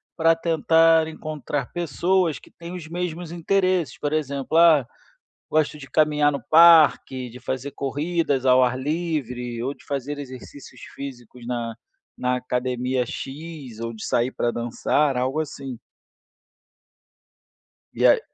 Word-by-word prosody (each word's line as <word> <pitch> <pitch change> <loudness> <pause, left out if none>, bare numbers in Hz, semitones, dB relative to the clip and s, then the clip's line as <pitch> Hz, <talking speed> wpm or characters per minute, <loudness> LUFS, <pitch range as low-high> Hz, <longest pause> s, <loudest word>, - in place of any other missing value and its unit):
para 165 0 +4
tentar 165 0 +4
encontrar 150 -3 -4
pessoas 175 +1 0
que - - -18
têm 170 +1 -10
os 175 -3 -7
mesmos 170 0 -4
interesses, 185 0 0
por 145 0 -2
exemplo, 140 0 -1
"ah, 160 -7 +6 0.6
gosto 155 -1 +1
de 140 -2 -11
caminhar 150 -1 +3
no 140 - -4
parque, 155 -6 +6
de 125 - -11
fazer 130 +2 -4
corridas 145 0 -1
ao 130 0 +6
ar 125 0 +1
livre, 130 -6 -3
ou 135 +3 -2
de - - -21
fazer 145 +1 -3
exercícios 130 -1 -10
físicos 125 -3 -9
na 120 -2 -3 0.4
na 125 0 0
academia 125 0 -1
'X' 140 -2 -8
ou 115 - -3
de 110 - -7
sair 120 +2 +1
pra 120 - -1
dançar", 125 +4 0
algo 130 +4 0
assim. 135 -4 -7 2.2
E - - +1
aí - - +6
145 Hz, 135 wpm, -23 LUFS, 125-160 Hz, 2.2 s, ah